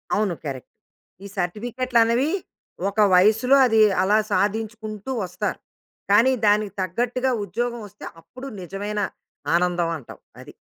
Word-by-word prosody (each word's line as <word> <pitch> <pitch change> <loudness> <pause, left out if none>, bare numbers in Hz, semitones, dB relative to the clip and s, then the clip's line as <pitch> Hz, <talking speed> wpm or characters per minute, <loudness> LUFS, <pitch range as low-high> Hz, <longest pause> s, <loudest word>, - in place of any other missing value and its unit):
అవును. 205 -4 0
కరెక్ట్. 135 -3 -6 0.6
ఈ - - -6
సర్టిఫికేట్లన్నవీ, 235 - +1 0.6
ఒక 205 - -5 0.2
వయసులో 220 +8 +5
అది 225 -2 +4 0.2
అలా 205 +3 +3
సాధించుకుంటూ 215 +2 -2
వస్తారు. 185 +2 -3 0.5
కానీ, 230 +6 +5 0.2
దానికి 205 -1 +2
తగ్గట్టుగా 245 +7 -1
ఉద్యోగవొస్తే, 235 -3 -5 0.2
అప్పుడు 255 +9 -10
నిజమైన 200 +4 -4 0.6
ఆనందం 175 -1 +1
అంటావు. 135 - -13 0.2
అది. - - -13
210 Hz, 105 wpm, -23 LUFS, 190-235 Hz, 0.6 s, వయసులో